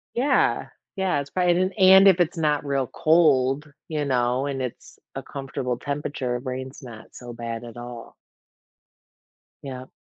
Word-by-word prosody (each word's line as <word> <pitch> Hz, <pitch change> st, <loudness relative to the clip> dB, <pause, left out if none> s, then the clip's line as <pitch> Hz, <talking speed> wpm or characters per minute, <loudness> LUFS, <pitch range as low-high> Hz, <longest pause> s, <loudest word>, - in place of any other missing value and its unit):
Yeah, 265 Hz, +4 st, +1 dB, 0.3 s
yeah, 190 Hz, -6 st, 0 dB
it's 140 Hz, 0 st, -6 dB
probab 180 Hz, -1 st, +2 dB
an 185 Hz, +1 st, 0 dB
and 190 Hz, +1 st, +8 dB
if 185 Hz, -2 st, +6 dB
it's 175 Hz, +1 st, 0 dB
not 150 Hz, -2 st, 0 dB
real 135 Hz, -3 st, 0 dB
cold, 150 Hz, -3 st, +2 dB, 0.2 s
you 150 Hz, -2 st, -2 dB
know, 125 Hz, 0 st, +1 dB
and 135 Hz, -2 st, -3 dB
it's 125 Hz, -2 st, -7 dB, 0.2 s
a -, -, -5 dB
comfortable 135 Hz, -3 st, -4 dB
temperature, 140 Hz, -3 st, -3 dB
rain's 130 Hz, +1 st, -6 dB
not 115 Hz, -4 st, -11 dB
so 120 Hz, -1 st, -10 dB
bad 115 Hz, 0 st, -6 dB
at 115 Hz, -, -10 dB
all. 120 Hz, -1 st, -9 dB, 1.5 s
Yep. 130 Hz, -1 st, -8 dB
135 Hz, 150 wpm, -24 LUFS, 125-160 Hz, 1.5 s, and